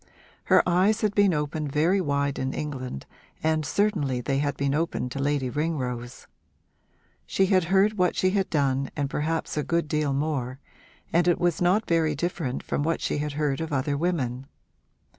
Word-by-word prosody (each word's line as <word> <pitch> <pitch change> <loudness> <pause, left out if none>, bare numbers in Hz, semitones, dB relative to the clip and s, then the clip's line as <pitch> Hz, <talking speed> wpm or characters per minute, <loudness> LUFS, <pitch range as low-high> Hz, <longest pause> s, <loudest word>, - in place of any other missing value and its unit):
Her - - +4
eyes 190 +5 +3
had 210 -2 +1
been 205 -2 +4
opened 150 -1 -2
very 170 +7 +2
wide 140 -3 0
in 130 0 -2
England 130 - -5 0.4
and 155 0 +1
certainly 155 - 0
they 135 +2 -1
had 145 0 -1
been 140 0 0
opened 150 -5 -1
to 140 - -4
Lady 140 -1 0
Ringrose. 125 -4 -3 1.0
She 195 - +2
had 185 -2 +3
heard 195 +3 +2
what 180 -1 +2
she 185 - +2
had 195 -1 0
done 135 -3 +1
and 145 -2 -2
perhaps 160 +1 -2
a 150 - +1
good 170 0 0
deal 150 -2 0
more, 135 -3 -2 0.5
and 175 +1 +3
it 175 - +3
was 175 -1 +1
not 185 +5 +3
very 160 -3 +1
different 160 -4 -3
from - - -2
what 165 +3 0
she - - -1
had 150 0 -3
heard 150 0 -1
of 160 -1 -4
other 140 +1 0
women. 135 -6 -1
150 Hz, 180 wpm, -26 LUFS, 140-175 Hz, 1.0 s, Her